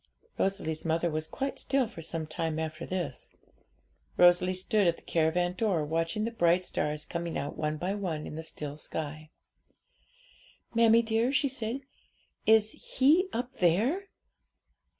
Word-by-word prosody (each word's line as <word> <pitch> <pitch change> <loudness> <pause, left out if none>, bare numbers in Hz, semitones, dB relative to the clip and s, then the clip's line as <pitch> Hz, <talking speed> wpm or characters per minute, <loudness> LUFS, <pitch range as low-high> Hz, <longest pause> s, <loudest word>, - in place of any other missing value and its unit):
Rosalie's 190 -5 0
mother 165 +1 +1
was 155 0 -2
quite 275 +8 -3
still 270 -2 +1
for 195 -7 -9
some 165 0 -3
time 155 0 -3
after 160 +1 -4
this. 180 -8 -4 0.9
Rosalie 180 +1 +5
stood 190 +1 +2
at 170 - +3
the - - -18
caravan 170 +2 +1
door, 180 -6 0
watching 165 +7 -1
the 230 - -1
bright 175 -4 +3
stars 150 -3 -2
coming 170 -1 -3
out 145 - -4
one 155 0 -2
by 180 +5 -2
one 175 -7 -3
in - - -7
the 160 - -5
still 150 -2 -6
sky. 155 0 -5 1.4
'Mammie 230 0 +5
dear,' 225 +2 +1
she 280 +1 +2
said, 255 -1 -4 0.7
'is 220 -1 +5 0.3
He 320 +9 +5
up 245 +2 -4
there?' 230 - +2
175 Hz, 150 wpm, -29 LUFS, 160-225 Hz, 1.4 s, Rosalie